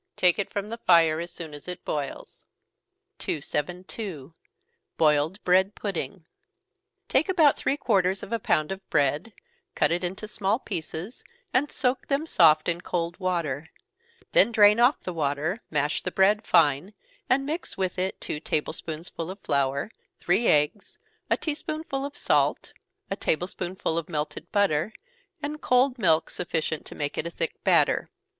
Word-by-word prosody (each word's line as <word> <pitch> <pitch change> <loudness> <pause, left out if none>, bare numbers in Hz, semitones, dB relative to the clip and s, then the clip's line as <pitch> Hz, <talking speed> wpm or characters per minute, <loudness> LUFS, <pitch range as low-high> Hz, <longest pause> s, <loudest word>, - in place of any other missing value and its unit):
Take 180 +2 +4
it 200 - -1
from 200 +1 -4
the 230 +1 -6
fire 165 -5 +4
as 170 +1 -4
soon 165 -3 -8
as 145 +3 -10
it 180 -1 -7
boils. 145 -2 -5 0.8
272. 170 - -4 0.6
Boiled 155 +4 +3
Bread 190 +3 +3
Pudding. 195 -3 -4 0.8
Take 300 +8 +2
about 320 -7 +5
three 280 - 0
quarters 195 -7 +1
of 225 - -6
a 230 - +1
pound 155 -5 +1
of 190 0 -5
bread, 145 +8 +1 0.4
cut - - +2
it 175 +2 0
into 190 +4 -4
small 210 0 0
pieces, 175 0 -5 0.3
and 275 +3 +2
soak 250 0 -1
them 280 +2 0
soft 160 - +5
in 170 0 0
cold 175 0 -3
water 165 -5 -2 0.6
then - - +5
drain 210 -1 +6
off 245 +4 +5
the 180 - -5
water, 155 - -1
mash 150 -1 0
the - - -2
bread 205 +3 +3
fine, 160 +6 +3 0.3
and 270 +2 +3
mix 315 +5 -4
with 185 -1 -2
it 190 +1 -2
two 150 - -4
table 150 0 -1
spoonsful 165 +1 -6
of 190 - -6
flour, 140 +6 0 0.3
three 235 - +1
eggs, 150 +7 +1 0.3
a - - +3
tea 310 - -2
spoonful 305 -3 -4
of 285 +1 -7
salt, - - +1 0.4
a - - +1
table 175 -3 0
spoonful 175 -2 -3
of 165 - -8
melted 150 -2 -4
butter, 200 -2 +2 0.5
and 300 +1 -4
cold 250 0 +3
milk 165 -6 +3
sufficient 160 -3 -3
to - - -8
make 145 -1 -3
it 170 - -1
a - - -3
thick 165 -1 -4
batter. - - +3
180 Hz, 160 wpm, -26 LUFS, 155-220 Hz, 0.8 s, drain